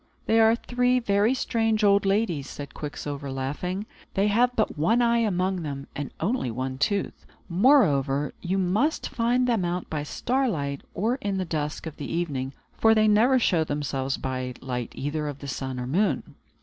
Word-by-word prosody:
"They 225 Hz, -, +3 dB
are 225 Hz, 0 st, +6 dB
three 250 Hz, +1 st, +1 dB
very 215 Hz, +1 st, +2 dB
strange 225 Hz, -3 st, 0 dB
old 200 Hz, -1 st, +4 dB
ladies," 195 Hz, -9 st, 0 dB
said 145 Hz, -1 st, -8 dB
Quicksilver, 145 Hz, -1 st, -5 dB
laughing. 150 Hz, +9 st, -3 dB, 0.3 s
"They 200 Hz, +2 st, +3 dB
have 245 Hz, +4 st, +3 dB
but 220 Hz, -, 0 dB
one 170 Hz, +11 st, +2 dB
eye 235 Hz, -1 st, +3 dB
among 190 Hz, -4 st, 0 dB
them, 140 Hz, -3 st, -5 dB
and 145 Hz, -1 st, -4 dB
only 205 Hz, -, 0 dB
one 130 Hz, +3 st, -4 dB
tooth. 200 Hz, +7 st, -1 dB, 0.2 s
Moreover, 150 Hz, -, +3 dB
you 185 Hz, +2 st, -1 dB
must 205 Hz, -, +1 dB
find 245 Hz, +2 st, +1 dB
them 230 Hz, -6 st, +1 dB
out 175 Hz, +1 st, -3 dB
by 155 Hz, -2 st, -1 dB
starlight, 155 Hz, -, -1 dB
or 225 Hz, +7 st, 0 dB
in 200 Hz, -6 st, -2 dB
the 185 Hz, -, -1 dB
dusk 150 Hz, -2 st, -3 dB
of 160 Hz, -2 st, -7 dB
the 145 Hz, -, -6 dB
evening; 145 Hz, -6 st, -2 dB, 0.2 s
for 225 Hz, 0 st, +4 dB
they 215 Hz, 0 st, +4 dB
never 225 Hz, +5 st, +5 dB
show 175 Hz, -9 st, +2 dB
themselves 140 Hz, -3 st, -2 dB
by 130 Hz, -1 st, -3 dB
the -, -, -16 dB
light 125 Hz, -3 st, -3 dB
either 150 Hz, +2 st, -2 dB
of 145 Hz, -2 st, -5 dB
the 140 Hz, -, -9 dB
sun 130 Hz, -1 st, -4 dB
or 125 Hz, -, -3 dB
moon." 180 Hz, +12 st, 0 dB
180 Hz, 180 wpm, -26 LUFS, 140-225 Hz, 0.3 s, are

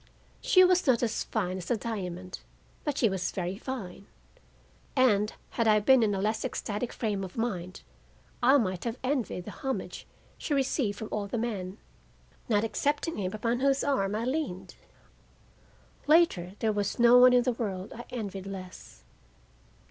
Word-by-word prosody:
She 400 Hz, -7 st, +6 dB
was 365 Hz, -2 st, +3 dB
not 250 Hz, -2 st, +3 dB
as 225 Hz, -2 st, -1 dB
fine 185 Hz, -4 st, -2 dB
as 175 Hz, -, -7 dB
the 240 Hz, -, 0 dB
diamond, 185 Hz, -5 st, -5 dB, 0.4 s
but 295 Hz, -2 st, -2 dB
she 235 Hz, -, +4 dB
was 190 Hz, -3 st, -1 dB
very 185 Hz, +2 st, -4 dB
fine, 200 Hz, -8 st, -6 dB, 0.9 s
and, 210 Hz, -6 st, +3 dB, 0.2 s
had 230 Hz, -2 st, 0 dB
I 215 Hz, -1 st, +5 dB
been 260 Hz, +4 st, +5 dB
in 210 Hz, -3 st, +2 dB
a -, -, -2 dB
less 215 Hz, +2 st, 0 dB
ecstatic 230 Hz, -2 st, -3 dB
frame 205 Hz, -4 st, -2 dB
of 185 Hz, +2 st, -8 dB
mind, 185 Hz, -6 st, -3 dB, 0.6 s
I 260 Hz, +4 st, +6 dB
might 185 Hz, -8 st, -1 dB
have 235 Hz, 0 st, -3 dB
envied 250 Hz, -9 st, -1 dB
the -, -, -6 dB
homage 270 Hz, -1 st, -5 dB, 0.3 s
she 295 Hz, -, -1 dB
received 260 Hz, -6 st, 0 dB
from 220 Hz, -, -6 dB
all 205 Hz, -1 st, -2 dB
the 235 Hz, -, -3 dB
men, 205 Hz, -5 st, -3 dB, 0.7 s
not 210 Hz, -2 st, +3 dB
excepting 290 Hz, +7 st, -1 dB
him 185 Hz, -2 st, -2 dB
upon 230 Hz, +3 st, -1 dB
whose 275 Hz, +1 st, +2 dB
arm 210 Hz, -8 st, 0 dB
I 225 Hz, +2 st, -2 dB
leaned. 245 Hz, -, -3 dB, 1.3 s
Later, 290 Hz, -, +4 dB
there 220 Hz, 0 st, 0 dB
was 205 Hz, -1 st, -2 dB
no 240 Hz, +1 st, +7 dB
one 250 Hz, 0 st, +8 dB
in 245 Hz, -1 st, +5 dB
the 250 Hz, 0 st, +1 dB
world 195 Hz, -4 st, -4 dB
I 240 Hz, +1 st, -9 dB
envied 195 Hz, -5 st, -5 dB
less. 185 Hz, -, -9 dB
220 Hz, 165 wpm, -29 LUFS, 195-255 Hz, 1.3 s, one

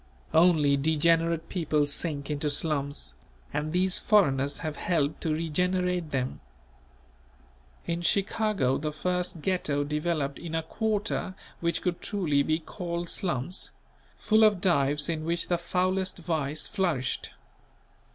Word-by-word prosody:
Only 160 Hz, -4 st, +5 dB
degenerate 165 Hz, +2 st, +2 dB
people 155 Hz, -5 st, +1 dB
sink 145 Hz, 0 st, -2 dB
into 150 Hz, 0 st, -1 dB
slums; 145 Hz, -, -1 dB, 0.4 s
and 150 Hz, +1 st, -2 dB
these 185 Hz, +2 st, +2 dB
foreigners 140 Hz, -10 st, +3 dB
have 155 Hz, -1 st, -3 dB
helped 155 Hz, -2 st, 0 dB
to 160 Hz, -, -1 dB
regenerate 180 Hz, +2 st, 0 dB
them. 130 Hz, -2 st, -2 dB, 1.5 s
In 170 Hz, 0 st, -2 dB
Chicago 195 Hz, -, +1 dB
the 150 Hz, +1 st, -2 dB
first 180 Hz, 0 st, -2 dB
Ghetto 155 Hz, -7 st, 0 dB
developed 150 Hz, -1 st, -1 dB
in 165 Hz, -1 st, -5 dB
a 160 Hz, -, 0 dB
quarter 210 Hz, 0 st, -1 dB, 0.2 s
which 170 Hz, 0 st, -1 dB
could 180 Hz, -2 st, -1 dB
truly 170 Hz, -9 st, +1 dB
be 155 Hz, +2 st, +1 dB
called 170 Hz, 0 st, -5 dB
slums; 175 Hz, 0 st, -1 dB, 0.5 s
full 220 Hz, 0 st, +3 dB
of 210 Hz, -3 st, +5 dB
dives 150 Hz, -5 st, +2 dB
in 160 Hz, -2 st, -2 dB
which 170 Hz, +1 st, -1 dB
the 175 Hz, -1 st, +1 dB
foulest 185 Hz, +2 st, 0 dB
vice 155 Hz, -4 st, -1 dB
flourished. 170 Hz, -10 st, -1 dB
165 Hz, 125 wpm, -28 LUFS, 150-180 Hz, 1.5 s, Only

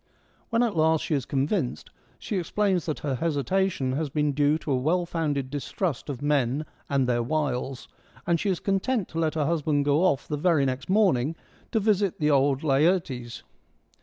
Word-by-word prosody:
When 230 Hz, +1 st, +2 dB
at 230 Hz, -5 st, 0 dB
last 160 Hz, 0 st, +3 dB
she -, -, -2 dB
is 140 Hz, -3 st, -1 dB
convinced, 140 Hz, -, -1 dB, 0.3 s
she 205 Hz, -, -4 dB
explains 185 Hz, 0 st, 0 dB
that 155 Hz, -, -1 dB
her 145 Hz, -2 st, -1 dB
hesitation 160 Hz, +1 st, 0 dB
has 145 Hz, +3 st, -2 dB
been 150 Hz, +1 st, 0 dB
due 145 Hz, +2 st, +2 dB
to 155 Hz, -, -5 dB
a -, -, +3 dB
well 165 Hz, +8 st, +1 dB
founded 145 Hz, -6 st, -2 dB
distrust 145 Hz, +1 st, -3 dB
of 140 Hz, -1 st, -5 dB
men 145 Hz, 0 st, +1 dB, 0.2 s
and 135 Hz, -3 st, +1 dB
their 120 Hz, -1 st, +1 dB
wiles, 135 Hz, -1 st, -2 dB, 0.4 s
and 170 Hz, -1 st, +2 dB
she 200 Hz, -, -1 dB
is 185 Hz, -, 0 dB
content 200 Hz, +2 st, 0 dB
to 165 Hz, -, -4 dB
let 160 Hz, -2 st, 0 dB
her 155 Hz, -2 st, +1 dB
husband 150 Hz, -2 st, +1 dB
go 145 Hz, +2 st, +3 dB
off 145 Hz, -7 st, +1 dB
the 150 Hz, -, -2 dB
very 155 Hz, -3 st, +2 dB
next 130 Hz, +2 st, -3 dB
morning 165 Hz, -, +2 dB, 0.4 s
to 225 Hz, -, +2 dB
visit 200 Hz, -3 st, +1 dB
the 150 Hz, -1 st, +2 dB
old 140 Hz, 0 st, +2 dB
Laertes. 140 Hz, -5 st, +1 dB
150 Hz, 185 wpm, -26 LUFS, 135-175 Hz, 0.4 s, last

